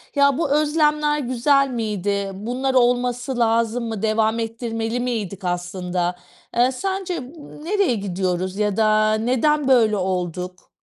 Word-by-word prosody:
ya, 280 -1 +4
bu 325 - 0
özlemler 300 0 +2
güzel 275 +2 +2
miydi? 205 -4 -2
Bunlar 250 +7 -2
olması 245 0 +1
lazım 230 +1 +1
mı? 220 -3 -4
Devam 220 +1 +1
ettirmeli 225 +1 -3
miydik 210 -6 -3
aslında? 180 0 -2 0.4
Eee, 250 +2 +4
sence 380 +3 -3
m 255 0 -9 0.3
nereye 385 - +1
gidiyoruz 185 -1 -2
ya 210 -1 0
da 215 0 +3
neden 260 +6 +1
böyle 225 -5 +4
olduk? 180 -1 -3
230 Hz, 125 wpm, -22 LUFS, 200-260 Hz, 0.4 s, ya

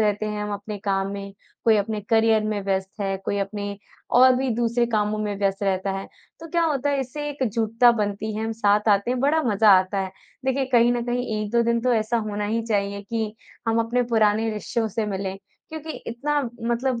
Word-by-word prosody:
रहते 210 0 +1
हैं 210 0 -3
हम 210 0 -3
अपने 205 +1 -5
काम 195 0 0
में, 200 0 -6 0.3
कोई 225 -2 +5
अपने 210 +1 -1
करियर 225 -1 +4
में 215 -1 -1
व्यस्त 190 +1 -2
है, 195 -1 -1
कोई 200 - -1
अपने 200 0 -4 0.4
और 255 0 +7
भी 265 +1 0
दूसरे 235 0 +1
कामों 210 0 +1
में 210 -1 -2
व्यस्त 195 0 0
रहता 195 0 0
है। 195 - -7 0.3
तो 330 - -9
क्या 340 0 +2
होता 285 -3 0
है 280 - +1
इससे 295 +3 -4
एक 280 -2 -2
जुड़ता 230 +2 +4
बनती 210 0 -2
है, 220 - -2
हम 225 - -2
साथ 210 -1 +2
आते 200 +3 +3
हैं 250 -1 0
बड़ा 305 +3 +3
मज़ा 215 -2 +4
आता 185 +2 -2
है। 190 0 -4 0.3
देखिए 265 +1 +1
कहीं 240 0 +5
न 240 - -1
कहीं 245 +1 -1 0.2
1-2 235 +3 +1
दिन 235 0 +1
तो 250 +1 +2
ऐसा 220 +1 +1
होना 205 0 -2
ही 225 +2 0
चाहिए 200 -2 -1
कि 220 +1 -3 0.3
हम 225 - +2
अपने 235 +2 +1
पुराने 220 0 +3
रिश्तों 220 +2 -2
से 215 +1 -2
मिलें। 195 -1 -3 0.3
क्योंकि 315 0 -7 0.2
इतना 285 +5 -1 0.3
मतलब 240 +1 0
220 Hz, 210 wpm, -24 LUFS, 205-240 Hz, 0.4 s, और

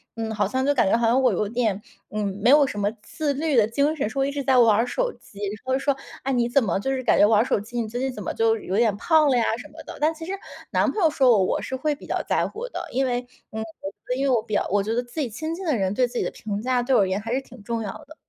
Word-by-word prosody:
嗯， 225 -1 -3
好 205 -2 +1
像 260 +5 -1
就 285 - +3
感 235 -7 +2
觉 - - +4
好 235 - +1
像 240 +4 +3
我 250 -4 +3
有 200 +2 -1
点， 220 -4 0 0.3
嗯， 210 0 -2 0.2
没 235 - +4
有 290 +1 +7
什 205 -6 -4
么 205 0 +1
自 300 -3 -2
律 295 -1 0
的 220 -2 +5
精 285 +6 +1
神， 245 -7 -1
说 270 - -2
我 - - +3
一 280 - -1
直 285 - -3
在 265 -1 +3
玩 230 -4 +6
儿 235 +2 +2
手 - - -1
机， 200 - -15
然 205 0 -3
后 260 0 +1
说： 275 +1 +1 0.3
“哎， 270 - -1
你 240 -2 +2
怎 245 +2 +3
么 195 -2 0
就 270 - -3
是 260 -1 -2
感 235 - +3
觉 - - +8
玩 215 -1 +4
儿 - - +3
手 - - +1
机， 235 +3 -4
你 220 - -3
最 240 +3 -4
近 265 +1 -1
怎 210 -4 -7
么 - - -3
就 225 0 +2
有 200 -3 -3
点 220 -3 +3
胖 310 +4 +3
了 260 - +3
呀 235 - +3
什 270 +5 -9
么 320 +1 -12
的。 - - -9
“但 305 +2 +2
其 325 0 -9
实 370 - -5 0.4
男 - - +2
朋 425 - -3
友 320 - +6
说 265 -4 +3
我， 200 -4 +4
我 - - -1
是 260 - -4
会 295 +3 0
比 285 - -11
较 - - -1
在 - - 0
乎 470 +4 -6
的， - - -6
因 265 +2 +1
为， 245 -1 0 0.3
嗯 220 - -4 0.2
我 195 +5 -5
因 270 - -1
为 275 - +2
我 240 -3 +3
比 215 - -8
较 - - +2
我 205 0 +3
觉 220 +2 -2
得 245 - 0
自 240 +6 -8
己 275 -5 -1
亲 315 +9 -4
近 380 +1 -7
的 305 - +1
人 190 -2 0
对 250 +2 +2
自 245 0 -7
己 - - +1
的 - - -2
评 205 -1 -5
价， 250 0 +1
对 260 +1 +2
我 - - +5
而 195 - +3
言 190 +1 -1
还 225 +3 -4
是 265 - 0
挺 265 - -15
重 230 +1 -2
要 205 - -4 0.2
的。 310 - -13
245 Hz, 360 characters per minute, -24 LUFS, 215-275 Hz, 0.4 s, 觉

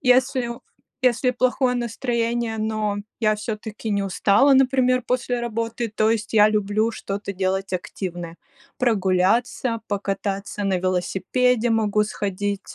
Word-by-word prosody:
если 250 0 0
плохое 255 0 +2
настроение, 235 -1 -1
но 215 -1 -1 0.2
я 215 -2 +3
всё-таки 215 +1 -5
не 200 -1 +1
устала, 200 +7 +4
например, 255 -1 +3
после 245 -1 -1
работы, 230 0 -3
то 215 +1 +1
есть 225 -1 -1
я 210 -1 +7
люблю 215 +1 +1
что-то 200 -1 -5
делать 190 +1 -2
активное 175 -2 -5 0.4
прогуляться, 225 +2 +1
покататься 200 0 -3
на 190 -2 +1
велосипеде, 205 +7 +1
могу 215 -2 +2
сходить, 205 -1 -3
215 Hz, 115 wpm, -23 LUFS, 200-240 Hz, 0.4 s, я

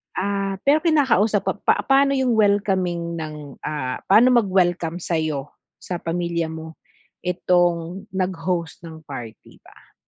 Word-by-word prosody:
Ah, 195 0 -1
pero 290 +3 +4
kinakausap 265 - +2
pa - - -10
pa - - +2
paano 275 0 +3
yung 260 -2 +1
welcoming 190 -5 +1
ng, 150 -3 -8
ah, 130 -4 -4
paano 240 +5 +6
mag-welcome 180 -4 0
sa'yo, 155 -4 -2 0.3
sa 180 -2 -4
pamilya 170 0 -2
mo 160 0 -9 0.5
itong 175 +1 0
nag-host 180 -3 -2
ng 160 -1 -10
party 125 -7 -10
ba? - - -20
175 Hz, 125 wpm, -22 LUFS, 160-200 Hz, 0.5 s, paano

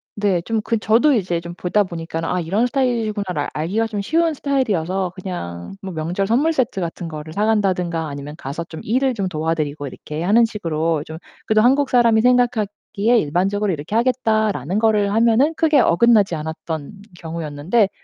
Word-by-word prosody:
네 200 -4 +1
좀 220 +4 -2
그 230 - 0
저도 230 +8 +3
이제 175 -5 -1
좀 170 0 -8
보다 195 +4 +1
보니까 165 -3 -5
'아 180 +2 -1
이런 195 +8 0
스타일이구나.'를 220 - -1
알기가 195 +9 -1
좀 210 -2 -4
쉬운 325 +7 +1
스타일이어서 195 - -1
그냥 85 - -6
뭐 190 -1 -6
명절 170 +5 -2
선물세트 255 0 +1
같은 170 0 -4
거를 155 0 -8
사간다든가 185 -6 0
아니면 145 +1 -7
가서 145 +2 -5
좀 165 -2 -10
일을 260 +4 +1
좀 200 -5 -2
도와드리고 155 -3 -2
이렇게 150 +4 -6
하는 220 +6 +5
식으로 165 -7 -2
좀 160 0 -8 0.3
그래도 215 0 +3
한국사람이 245 -3 +4
생각하기에 230 -2 +1
일반적으로 190 +6 0
'이렇게 155 +7 -5
하겠다.'라는 220 - +1
거를 210 -2 +2
하면은 230 +7 +3
크게 310 -3 +3
어긋나지 205 -2 +4
않았던 160 0 -5 0.3
경우였는데. 165 +6 -1
195 Hz, 405 characters per minute, -20 LUFS, 165-225 Hz, 0.3 s, 하는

